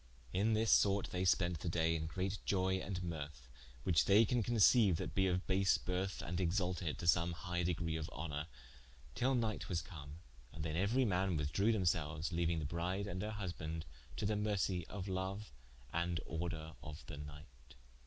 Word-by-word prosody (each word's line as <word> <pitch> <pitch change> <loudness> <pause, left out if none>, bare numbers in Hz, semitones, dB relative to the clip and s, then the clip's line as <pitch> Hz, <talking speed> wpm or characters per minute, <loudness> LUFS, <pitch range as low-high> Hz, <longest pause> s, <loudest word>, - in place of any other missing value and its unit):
In 110 +4 +2
this 110 +1 +2
sorte 100 -1 +4
they 90 0 -1
spent 90 -2 +2
the 85 - -3
day 80 -1 +2
in 80 -1 -2
great 95 +4 -2
ioye 95 -1 +1
and 90 -2 -3
mirthe 75 -7 -6 0.4
(which 85 -4 +3
they 105 +3 +6
can 120 +3 +1
conceiue, 110 -3 +5
that - - -4
be 95 -1 +3
of 90 0 0
base 95 0 +3
birth, 95 +1 -2
and 90 +1 -2
exalted 90 -2 0
to - - -6
some 85 0 +3
highe 90 0 -2
degree 85 -1 -1
of 80 -1 -4
honour) 75 0 -4 0.7
till 130 +2 +2
night 115 -3 -1
was 85 -4 -1
come, 75 -3 -9 0.3
and 75 - -6
then 80 - -2
euery 110 +9 +2
man 95 -4 +1
withdrewe 80 +9 +2
them 110 -4 +1
selues, 80 -1 0
leauing 85 0 +1
the 75 - -2
bride 90 +5 -2
and 95 -2 -4
her 105 +1 -3
husbande 80 -5 -4 0.3
to - - -2
the 105 +1 +1
mercie 100 -4 0
of 95 0 -6
loue, 95 +1 -2 0.5
and 85 0 0
order 80 -1 -4
of 75 +1 -8
the 80 - -7
night. 75 -4 -11
90 Hz, 185 wpm, -37 LUFS, 80-100 Hz, 0.7 s, they